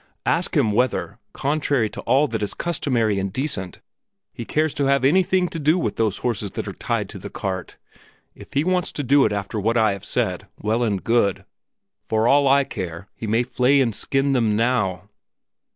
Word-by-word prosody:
Ask 170 0 +1
him 120 -7 +3
whether, 125 +4 0
contrary 140 -4 0
to - - -7
all 135 +5 +3
that 110 -2 -3
is 105 - -2
customary 120 -11 0
and 95 0 -2
decent, 100 -8 -3 0.5
he 115 - -7
cares 155 +3 0
to 140 - 0
have 140 -1 +2
anything 185 +4 +3
to 165 - -5
do 155 +4 +3
with 175 - -2
those 110 -4 +1
horses 110 -4 -2
that - - -4
are - - -4
tied - - -2
to - - -8
the - - -7
cart. 95 -2 -5 0.6
If - - -14
he 140 - +2
wants 180 0 0
to 145 - -3
do 140 +2 +4
it 110 - +1
after 100 +1 -3
what 115 +4 +1
I 110 -2 +4
have 100 -1 -6
said, - - -2
well 110 +3 -1
and 105 -5 0
good. 115 -4 +1 0.6
For 110 +1 +1
all 140 +2 +4
I 140 +1 +5
care, 95 -5 -6
he 110 - -7
may 115 +3 +2
flay 125 +3 +2
and 120 -4 +2
skin 135 +6 0
them 115 -5 +2
now." 105 -5 0
120 Hz, 200 wpm, -22 LUFS, 105-140 Hz, 0.6 s, I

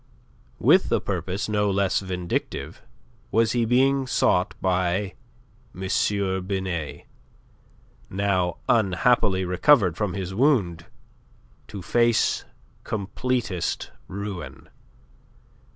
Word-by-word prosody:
With - - +4
a - - +3
purpose 95 +2 -3
no 105 -1 +1
less 100 -1 +1
vindictive 90 -3 -4 0.5
was 115 +1 +2
he 120 -2 +1
being 135 +3 +2
sought 90 -7 +2
by 95 +1 0 0.7
M. 95 - -3 0.6
Binet, 95 -6 -3 1.0
now 95 -2 0
unhappily 100 -2 +2
recovered 90 - +4
from 100 -2 -2
his 95 -1 -4
wound 100 - +1 0.8
to 100 -3 -8
face 120 +4 +2 0.4
completest 110 -2 -2 0.2
ruin. 100 -1 -7
100 Hz, 90 wpm, -24 LUFS, 90-115 Hz, 1.0 s, With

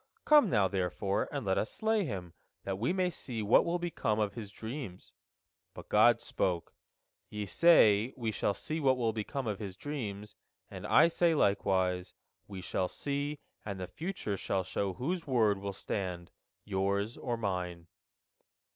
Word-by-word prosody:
Come 300 -1 +6
now, 100 -5 +3
therefore, 95 +1 -1
and 140 -6 -3
let 95 -1 +2
us 110 - -2
slay 220 -2 +1
him, 90 - -5 0.3
that 95 0 -3
we 120 - +1
may 185 -1 +1
see 120 -7 -5
what 105 - +5
will 170 +1 0
become 170 -11 -1
of 105 -2 0
his 105 -3 -7
dreams." 110 -3 -7 0.6
But - - -10
God - - +6
spoke: 90 -3 -2 0.6
"Ye 105 -1 -4
say, 110 - +5
We 115 -3 -1
shall 100 -1 0
see 155 +1 -3
what 135 -3 +3
will 115 -3 0
become 115 +5 -3
of 105 -2 -2
his 100 -4 -6
dreams, 105 -7 -5 0.4
and - - -6
I - - +6
say 170 0 +2
likewise, 95 -5 +1 0.3
We 95 -2 -7
shall 90 0 -1
see, 145 +6 -2 0.3
and 100 -2 -5
the 90 - -3
future 155 - -4
shall 95 0 -1
show 95 +1 -2
whose 165 - -3
word 110 -6 +3
will 100 0 -4
stand, 90 -3 -4 0.3
yours 100 +2 0
or 120 -2 -3
Mine." 90 -5 -3
105 Hz, 165 wpm, -32 LUFS, 95-140 Hz, 0.6 s, Come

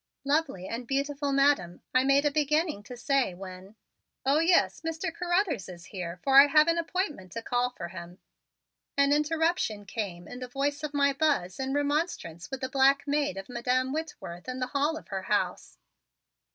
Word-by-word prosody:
"Lovely 280 - 0
and 235 +1 -5
beautiful 280 +1 -1
Madam," 275 -11 +2
I 255 - +4
made 275 +2 +3
a 295 - +3
beginning 300 - +1
to 245 - -9
say, 260 - +1
when 190 +2 -10 0.5
"Oh, 280 +3 +4
yes, 335 +2 +3
Mr. 325 0 -3
Carruthers 350 - 0
is 175 -1 -10
here, 180 -3 -6
for 270 0 +7
I 285 - +5
have 305 +2 +5
an 335 0 +2
appointment 330 - -3
to 230 - -5
call 245 +1 +1
for 170 -8 -7
him," 170 0 -9 0.8
an 280 0 +4
interruption 300 - 0
came 190 -6 -5
in 245 - -8
the 250 - -5
voice 285 +3 -2
of 300 -1 -5
my 280 -1 +3
Buzz 270 - 0
in 265 +1 -2
remonstrance 285 - -1
with 270 0 -5
the 260 - -1
black 275 +1 +4
maid 285 -8 0
of 195 - -6
Madam 250 +2 0
Whitworth 255 - -6
in 255 - -4
the 255 - -1
hall 295 +3 +1
of - - -12
her 195 -2 -3
house. 185 - -1
275 Hz, 180 wpm, -28 LUFS, 205-300 Hz, 0.8 s, for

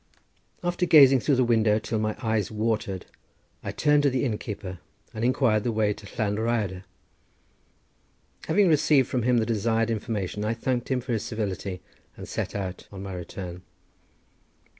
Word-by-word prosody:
After 175 0 0
gazing 135 -5 +8
through 140 +2 +2
the 130 - +3
window 110 -3 +3
till 110 0 -2
my 110 0 -1
eyes 110 -3 0
watered, 110 -4 -2 0.6
I - - -3
turned 150 0 +3
to 145 - +3
the 130 0 0
innkeeper, 105 -5 -4 0.3
and 110 - -4
inquired 120 -4 +2
the 120 - 0
way 105 -2 +1
to 100 - -13
Llan 105 -3 0
Rhyadr. 105 -5 -1 1.6
Having 195 +4 +4
received 150 -4 +4
from 125 - -1
him 125 +1 +3
the 110 - +2
desired 115 +1 +1
information, 105 -2 -3
I 110 +2 0
thanked 120 +1 -2
him 130 -2 0
for 125 0 -3
his 110 - -1
civility, 100 -4 -4 0.4
and - - -8
set - - -4
out 95 -2 -5
on 100 -1 -8
my 95 -1 -6
return. 90 0 -7
110 Hz, 160 wpm, -26 LUFS, 105-125 Hz, 1.6 s, gazing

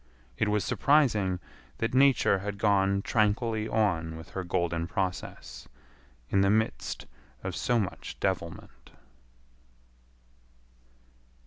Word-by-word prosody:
It 110 - 0
was 105 -2 +1
surprising 110 -11 +2 0.4
that 115 +1 -2
Nature 130 -7 +4
had 100 +1 -5
gone 100 -1 +2
tranquilly 110 0 +1
on 85 -7 0
with 80 +2 -11
her 95 +1 -4
golden 85 -1 -1
process 90 -9 -4 0.6
in 100 - +4
the 95 - +4
midst 105 - 0 0.4
of 95 -1 -3
so 120 - +1
much 100 -5 -4
devilment. 95 -4 -4
100 Hz, 105 wpm, -29 LUFS, 90-110 Hz, 0.6 s, Nature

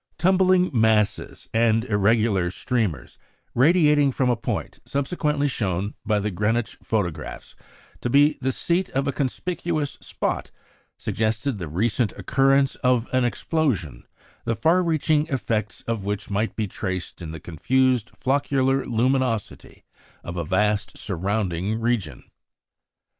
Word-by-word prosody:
Tumbling 185 +1 +3
masses 110 -3 +1
and 115 0 +3
irregular 105 -3 +2
streamers 110 - -2 0.3
radiating 150 0 +4
from 130 -1 +1
a - - +2
point 115 - -4
subsequently 145 0 -1
shown 100 -6 -2
by 105 -1 +1
the 105 +1 -1
Greenwich 110 +5 0
photographs 95 -8 -3 0.5
to 120 - -1
be 145 +4 +5
the 130 0 +1
seat 175 +6 0
of 135 +1 +1
a - - +2
conspicuous 155 +3 -2
spot, - - -3 0.5
suggested 110 +2 -1
the 85 - -4
recent 105 +7 0
occurrence 135 0 +2
of 125 -2 +2
an 130 0 +3
explosion, 120 - -1 0.4
the 115 0 -1
far 170 +9 +3
reaching 155 -2 +1
effects 110 -5 -2
of 115 -3 -3
which 105 +1 -4
might 105 +3 -1
be 110 -2 -1
traced 95 -2 -5
in 80 - -6
the 80 0 -7
confused 125 - +1
floccular 135 0 +1
luminosity 125 -1 -1 0.4
of 85 - -6
a 85 - -2
vast 105 +5 0
surrounding 100 +1 -2
region. 115 - -1
115 Hz, 125 wpm, -24 LUFS, 105-140 Hz, 0.5 s, be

